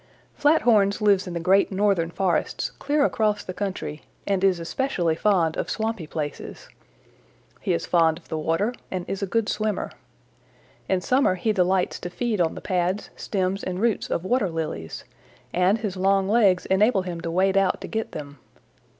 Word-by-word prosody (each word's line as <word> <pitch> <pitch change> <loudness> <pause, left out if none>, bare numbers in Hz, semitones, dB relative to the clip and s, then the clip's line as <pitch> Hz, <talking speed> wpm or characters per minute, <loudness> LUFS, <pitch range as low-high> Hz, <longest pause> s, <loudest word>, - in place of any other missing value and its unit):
"Flathorns 235 -10 +3
lives 200 -3 +3
in 175 - -5
the - - -1
great 190 +5 +3
northern 190 -4 +1
forests 180 +1 -1
clear 290 0 +2
across 210 -5 0
the 185 - -6
country, 185 -6 -4 0.2
and 195 -1 0
is 190 -3 +3
especially 175 -2 -1
fond 170 -3 +2
of - - -3
swampy 220 -7 -2
places. 150 -2 -6 0.9
He - - -2
is 85 - -1
fond 165 -2 +3
of 170 - -17
the 160 - -3
water 165 +9 0 0.2
and 180 -2 -4
is 195 - -4
a 200 - -1
good 225 +2 0
swimmer. 215 -1 -2 1.0
In 190 -1 +1
summer 255 -1 +2
he 215 +4 0
delights 185 -1 +1
to 175 - -5
feed 220 0 -1
on 165 -2 +1
the - - -7
pads, 185 +1 -1
stems 195 0 -2
and 185 0 -3
roots 225 -1 0
of 170 - -2
water 225 -2 +1
lilies, 155 - -5 0.5
and 180 +4 +3
his 210 -4 -4
long 195 +1 +2
legs 200 -4 +3
enable 195 +1 +3
him 175 -2 -5
to 170 - -4
wade 190 +3 +2
out 195 -1 +2
to - - -6
get 220 0 -3
them. 145 -2 -8
190 Hz, 175 wpm, -24 LUFS, 175-210 Hz, 1.0 s, Flathorns